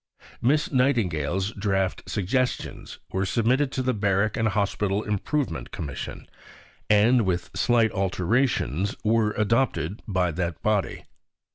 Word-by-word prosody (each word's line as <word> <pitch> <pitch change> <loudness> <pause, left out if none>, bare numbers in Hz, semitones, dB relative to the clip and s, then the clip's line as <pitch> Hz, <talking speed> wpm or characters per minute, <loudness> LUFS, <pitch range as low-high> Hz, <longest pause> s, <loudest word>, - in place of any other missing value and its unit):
Miss 150 +5 +2
Nightingale's 95 - +1
draft 95 -2 -1
"Suggestions" 125 +6 -2
were 95 - 0
submitted 125 +7 +1
to 130 - -1
the 130 0 +1
Barrack 100 0 +1
and 115 - +1
Hospital 100 0 0
Improvement 105 - -2
Commission, 70 -3 -6 0.6
and 110 +3 +5
with 90 -3 -2
slight 115 +3 +3
alterations 100 - 0
were 110 -1 +2
adopted 110 -3 0
by 90 -4 +1
that 85 -1 -3
body. 105 -2 0
105 Hz, 115 wpm, -25 LUFS, 95-120 Hz, 0.6 s, and